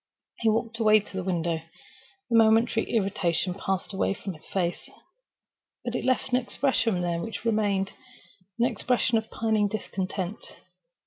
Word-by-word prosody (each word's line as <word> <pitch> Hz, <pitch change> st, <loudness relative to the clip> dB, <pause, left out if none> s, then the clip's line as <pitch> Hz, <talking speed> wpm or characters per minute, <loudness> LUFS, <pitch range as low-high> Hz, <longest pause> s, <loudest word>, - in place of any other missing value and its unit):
He 225 Hz, -, +3 dB
walked 230 Hz, +1 st, -1 dB
away 215 Hz, -1 st, +6 dB
to 205 Hz, -, -12 dB
the 190 Hz, -, -2 dB
window. 170 Hz, -3 st, -1 dB, 0.7 s
The -, -, +3 dB
momentary 225 Hz, 0 st, +4 dB
irritation 190 Hz, -4 st, +1 dB
passed 190 Hz, +1 st, -3 dB
away 195 Hz, 0 st, 0 dB
from 195 Hz, -1 st, -6 dB
his 155 Hz, -, -15 dB
face; 175 Hz, -2 st, -2 dB, 1.0 s
but 240 Hz, -, -2 dB
it -, -, -2 dB
left 260 Hz, +1 st, +1 dB
an 250 Hz, -, +3 dB
expression 245 Hz, -5 st, 0 dB
there 170 Hz, -1 st, -1 dB
which 225 Hz, +2 st, -6 dB
remained—an 205 Hz, 0 st, -2 dB
expression 240 Hz, 0 st, +1 dB
of 220 Hz, -, -10 dB
pining 220 Hz, -2 st, +1 dB
discontent. 195 Hz, -1 st, -3 dB
215 Hz, 140 wpm, -27 LUFS, 190-230 Hz, 1.0 s, away